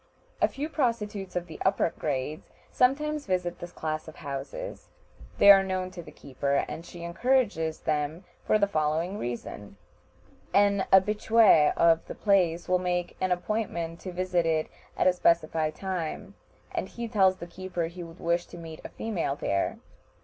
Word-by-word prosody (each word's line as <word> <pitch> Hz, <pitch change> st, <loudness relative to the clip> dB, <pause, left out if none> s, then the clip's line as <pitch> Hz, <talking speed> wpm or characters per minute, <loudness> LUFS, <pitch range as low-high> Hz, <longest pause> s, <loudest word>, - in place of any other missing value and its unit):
A -, -, +6 dB
few 290 Hz, +3 st, -4 dB
prostitutes 220 Hz, -, -2 dB
of 175 Hz, -1 st, -1 dB
the 160 Hz, -2 st, -10 dB
upper 190 Hz, -3 st, +2 dB
grades 150 Hz, +1 st, -3 dB, 0.2 s
sometimes 300 Hz, +3 st, +1 dB
visit 180 Hz, -1 st, -1 dB
this 175 Hz, -, -8 dB
class 155 Hz, 0 st, -4 dB
of 160 Hz, -, -10 dB
houses; 140 Hz, -, -6 dB, 0.5 s
they 200 Hz, -, +9 dB
are 195 Hz, -1 st, +8 dB
known 185 Hz, -1 st, -2 dB
to 180 Hz, -1 st, -8 dB
the -, -, -12 dB
keeper, 140 Hz, +1 st, -1 dB
and 165 Hz, -, -6 dB
she 170 Hz, 0 st, -10 dB
encourages 170 Hz, -4 st, 0 dB
them 150 Hz, +3 st, -1 dB, 0.2 s
for -, -, +3 dB
the 205 Hz, -, +3 dB
following 165 Hz, +2 st, -1 dB
reason: 115 Hz, -4 st, -6 dB, 0.8 s
An 200 Hz, -1 st, +4 dB
habitué 210 Hz, -4 st, +5 dB
of 165 Hz, -1 st, +4 dB
the -, -, -6 dB
place 180 Hz, -5 st, +2 dB
will 180 Hz, 0 st, +3 dB
make 180 Hz, -1 st, -2 dB
an 185 Hz, -1 st, +1 dB
appointment 175 Hz, -3 st, -2 dB
to 185 Hz, -, -6 dB
visit 180 Hz, -1 st, 0 dB
it 160 Hz, -1 st, +1 dB, 0.3 s
at -, -, +2 dB
a 185 Hz, -, +5 dB
specified 160 Hz, -3 st, +1 dB
time, 185 Hz, 0 st, -4 dB, 0.4 s
and 190 Hz, -, -3 dB
he 235 Hz, 0 st, -5 dB
tells 190 Hz, -4 st, +4 dB
the 170 Hz, -, -7 dB
keeper 180 Hz, 0 st, -4 dB
he 170 Hz, +2 st, -8 dB
would 165 Hz, +1 st, -10 dB
wish 170 Hz, +1 st, 0 dB
to -, -, -11 dB
meet 165 Hz, -2 st, -9 dB
a -, -, -7 dB
female 180 Hz, -11 st, -2 dB
there. 100 Hz, -8 st, -1 dB
175 Hz, 165 wpm, -28 LUFS, 160-200 Hz, 0.8 s, they